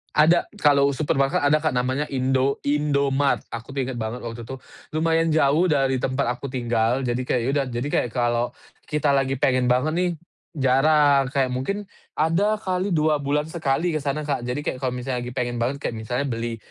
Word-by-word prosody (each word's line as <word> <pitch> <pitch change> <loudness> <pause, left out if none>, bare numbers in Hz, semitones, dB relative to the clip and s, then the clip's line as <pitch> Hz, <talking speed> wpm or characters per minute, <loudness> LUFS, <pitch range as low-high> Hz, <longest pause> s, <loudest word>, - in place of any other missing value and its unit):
Ada, 160 +3 +4 0.2
kalau 140 -1 +4
supermarket 135 -2 +1
ada, 150 +2 +4
Kak, 155 -2 -1
namanya 130 +4 0
Indo 130 0 0
Indomaret. 140 -1 +1
Aku 115 +4 -7
tuh 135 - 0
ingat 125 -1 -5
banget 110 +2 -4
waktu 115 0 -6
itu, 135 - -5 0.4
lumayan 165 +1 +2
jauh 155 +3 +3
dari 135 -4 +1
tempat 130 +2 -1
aku 140 - -6
tinggal, 120 0 0
jadi 120 0 -1
kayak 125 - +1
ya 125 - -1
udah, 140 -1 +1
jadi 120 +3 -3
kayak 120 - +1
kalau 120 -1 +1 0.4
kita 150 -1 +1
lagi 135 -1 +1
pengen 130 -1 +2
banget 125 +5 +2
nih 180 0 +1 0.5
jarang, 140 0 +4
kayak 135 -3 0
mungkin 200 +11 -3 0.3
ada 190 +7 +2
kali 185 -2 -2
2 155 -4 +2
bulan 145 +2 0
sekali 160 +1 -1
ke 155 - -1
sana, 145 +2 -2
Kak. 140 -4 -1
Jadi 125 +5 -4
kayak - - -2
kalau 130 - 0
misalnya 125 0 -3
lagi 120 - -5
pengen 120 -1 -3
banget, 130 +4 0
kayak 140 - -4
misalnya 125 +5 -2
beli 115 -3 -3
135 Hz, 190 wpm, -23 LUFS, 125-150 Hz, 0.5 s, Ada